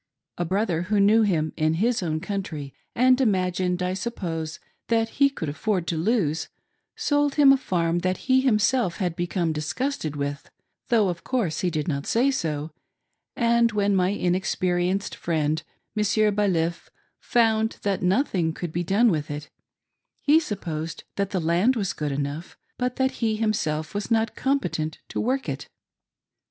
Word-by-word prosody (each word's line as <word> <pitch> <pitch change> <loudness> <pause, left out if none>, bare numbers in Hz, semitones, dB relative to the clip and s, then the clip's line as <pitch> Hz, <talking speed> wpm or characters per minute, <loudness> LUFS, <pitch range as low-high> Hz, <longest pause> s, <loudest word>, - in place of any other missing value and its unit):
A 175 - 0
brother 185 -2 0
who 210 -1 +3
knew 210 +3 +5
him 165 -7 +1
in 155 0 +1
his 225 +5 +1
own 155 -3 -1
country, 160 -9 -4 0.2
and 255 +2 +4
imagined, 180 -4 +1
I 180 0 0
suppose, 170 -6 -4 0.3
that 225 -1 +2
he 280 +3 +3
could 220 - -5
afford 180 +4 -1
to 170 - -1
lose, 160 -3 0 0.5
sold 290 -10 +1
him 280 -2 +7
a - - +5
farm 175 -8 0
that 185 +1 -2
he 260 0 +4
himself 225 -5 +2
had 180 -4 -1
become 175 -1 -1
disgusted 155 - -2
with, 140 0 -4 0.4
though, 220 -4 +3
of 170 -1 -5
course, 215 -12 -1
he 180 - +1
did 155 -3 -2
not 140 -3 -2
say 255 +4 +3
so, 155 - -2 0.6
and 235 -1 +3
when 205 -1 +2
my 185 -1 +3
inexperienced 185 0 0
friend, 155 -2 0 0.3
Monsieur 210 0 +2
Baliff, 180 -5 0 0.3
found 225 -2 +2
that 200 -2 0
nothing 180 - +1
could 170 -1 -5
be 175 +2 -1
done 210 +6 +3
with 150 -4 -2
it, 145 0 -6 0.7
he 300 +2 +5
•supposed 165 - -5
that 200 -1 -1
the 195 - -1
land 175 +10 +2
was 200 -5 -1
good 150 -1 -3
enough 145 +4 -4 0.2
but 250 0 -2
that 265 0 +1
he 220 -2 +2
himself 165 -8 -1
was 205 0 -3
not 225 -1 +1
competent 265 - -1
to - - -2
work 265 +3 -1
it. - - -5
190 Hz, 160 wpm, -25 LUFS, 165-225 Hz, 0.7 s, him